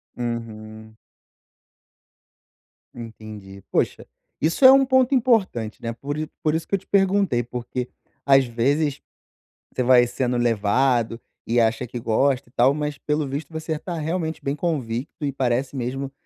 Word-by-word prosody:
Uhum. 110 -2 -6 2.0
Entendi. 110 -4 -10
Puxa, - - 0 0.4
isso 165 - +2
é 260 - +12
um 270 0 +6
ponto 260 0 +3
importante, 210 - +1
né? 115 0 -3
Por 140 +5 -5
i 155 - -3
por 155 0 +1
isso 160 - -3
que - - +1
eu - - -2
te 195 - -26
perguntei, 195 -10 +2
porque 125 +1 -5 0.4
às 135 -1 +5
vezes 140 +5 0 0.7
você 125 - -1
vai 125 -1 +5
sendo 125 0 -1
levado 120 +1 +1 0.3
e 120 +1 +2
acha 115 +2 +1
que 120 +1 -6
gosta 125 +3 +1
e - - -26
tal, 130 +2 +4
mas 150 -1 -3
pelo 150 0 -1
visto 140 +5 -5
você 160 0 -4
está 170 +3 -4
realmente 160 +1 -3
bem 140 - -1
convicto 145 -2 -3
e 140 - -1
parece 130 +1 -1
mesmo 135 +2 -4
130 Hz, 150 wpm, -23 LUFS, 120-155 Hz, 2.0 s, é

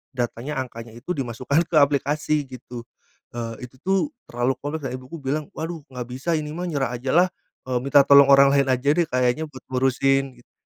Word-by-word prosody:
datanya, 125 +4 -3
angkanya 115 -2 -8
itu 125 +9 -14
dimasukkan 135 +5 0
ke - - -2
aplikasi, 145 +1 +1
gitu. 125 -2 -9 0.5
Eee, 115 +1 -5
itu 130 - -23
tuh, 190 +1 +2 0.3
terlalu 120 +2 0
kompleks, 145 +1 -4
dan - - -6
Ibuku 130 +6 -9
bilang, 145 +2 -2
"Waduh! 160 0 -4
nggak 125 -1 -5
bisa 130 +7 -2
ini 150 -1 -4
mah, 180 +1 -3
nyerah 140 -6 -1
aja 130 +2 -3
lah. 180 +1 +6 0.4
Eee, 125 -1 0
minta 140 0 +5
tolong 140 -1 +8
orang 140 0 +7
lain 140 -1 +3
aja 130 +2 +2
deh, 175 -1 +2
kayaknya 125 +5 +1
buat 130 -2 -13
ngurusin", 135 0 +1
gitu. - - -34
135 Hz, 190 wpm, -23 LUFS, 125-150 Hz, 0.5 s, tolong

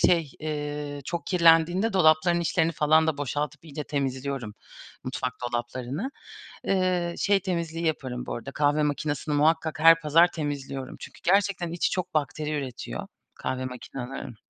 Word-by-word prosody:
şey, 165 -5 +3
eee, 150 -1 -4
çok 170 -1 -4
kirlendiğinde 175 +4 +4
dolapların 170 -1 +4
içlerini 165 0 +1
falan 155 +1 +4
da 150 -3 0
boşaltıp 145 +3 -3
iyice 150 -2 -6
temizliyorum 135 -5 -3 0.5
mutfak 130 -1 -2
dolaplarını. 125 - -3 0.6
Iıı, 180 -2 +1
şey 200 -1 +3
temizliği 170 -3 -2
yaparım 130 -6 -2
bu - - -4
arada, 125 +3 -7
kahve 150 +1 +2
makinesini 150 0 -1
muhakkak 160 +1 +2
her 165 +1 +8
pazar 165 +3 +5
temizliyorum. 140 -4 -4
Çünkü - - -11
gerçekten 190 -2 +2
içi 170 - 0
çok 185 -2 -2
bakteri 155 0 -1
üretiyor 125 - -5 0.3
kahve 130 0 -3
makinelerin. 125 -1 -7
155 Hz, 135 wpm, -26 LUFS, 140-170 Hz, 0.6 s, her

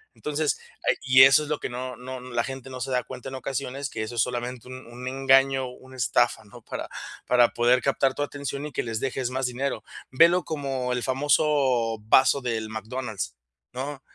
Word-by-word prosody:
Entonces, 150 0 -1 0.3
hay - - +4
y 130 -1 +7
eso 135 +3 +7
es 150 - -8
lo 150 - -1
que - - -4
no 125 0 -5
no 130 +1 -7
la 120 -2 -2
gente 135 0 -7
no 130 - -6
se 135 - -3
da 125 -1 +1
cuenta 125 - -9
en 135 - -7
ocasiones 135 0 -4
que - - -5
eso 110 +2 -5
es 115 - +2
solamente 125 0 -3
un 130 0 -9
un 125 +2 -8
engaño, 135 0 +3
una 130 +1 -13
estafa, 120 - +2
¿no? - - -14
Para - - -6 0.4
para 120 -1 +5
poder 120 +1 +3
captar 135 -1 +1
tu 145 - -1
atención 140 0 -5
y 150 - -6
que - - -1
les 115 -2 -3
dejes 130 -1 -2
más 130 +1 -2
dinero, 130 +3 -2 0.3
ve 165 +6 +7
lo 180 +1 +1
como 135 -4 -2
el 125 - -2
famoso 130 -4 +2
vaso 130 +6 +4
del 115 -3 -2
McDonald's, 110 - -5 0.4
¿no? 135 +2 -5
130 Hz, 205 wpm, -26 LUFS, 125-135 Hz, 0.4 s, y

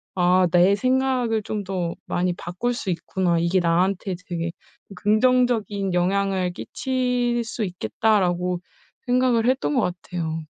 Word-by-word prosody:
'아 180 0 +4
내 180 +3 +5
생각을 255 -2 +1
좀 210 -1 -3
더 180 -3 -3
많이 180 0 0
바꿀 180 +8 -3
수 220 - -4
있구나. 175 0 0
이게 170 +3 +2
나한테 180 +3 +1
되게 170 -3 -3 0.4
긍정적인 215 -3 +2
영향을 185 0 +1
끼칠 250 +1 -1
수 225 -1 -3
있겠다.'라고 180 - 0 0.5
생각을 245 -2 +2
했던 265 +2 0
것 255 - +3 0.2
같아요. 165 -2 -4
195 Hz, 260 characters per minute, -23 LUFS, 180-240 Hz, 0.5 s, 내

